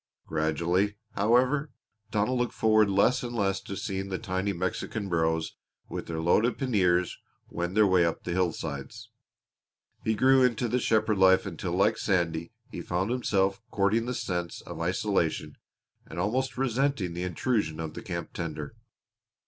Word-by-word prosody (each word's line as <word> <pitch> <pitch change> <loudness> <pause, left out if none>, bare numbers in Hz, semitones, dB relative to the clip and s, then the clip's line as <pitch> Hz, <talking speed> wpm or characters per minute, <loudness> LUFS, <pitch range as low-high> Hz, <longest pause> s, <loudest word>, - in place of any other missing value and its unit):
Gradually, 85 +6 0 0.2
however, 125 +8 +2 0.4
Donald 110 +5 +1
looked 120 - -1
forward 110 -2 +4
less 110 +6 +3
and 120 -2 -5
less 95 -3 0
to 100 - -6
seeing 95 -1 -3
the 95 - -2
tiny 95 -1 -2
Mexican 95 +3 -3
burros 80 -1 0 0.3
with - - -5
their 80 -1 -3
loaded 105 +9 +2
paniers 90 -9 +1 0.3
wend 85 +3 -3
their 110 - +7
way 95 -3 +4
up 85 -1 -1
the 90 - -4
hillsides. 85 -6 -3 0.9
He 110 - +1
grew 130 +4 +5
into 125 -1 +2
the 125 +3 +1
shepherd 110 -3 +2
life 95 0 +5
until - - -4
like - - +2
Sandy 85 -3 0 0.2
he - - -5
found 95 +6 -1
himself 100 -4 +1
courting 105 +4 +1
the 125 - -2
sense 90 -4 -3
of - - -8
isolation - - 0 0.5
and - - -9
almost 125 +7 -1
resenting 130 -7 0
the 85 - -4
intrusion 90 -1 -1
of 80 -1 -4
the - - -7
camp 85 -6 -5
tender. 80 -2 -5
100 Hz, 155 wpm, -28 LUFS, 85-115 Hz, 0.9 s, their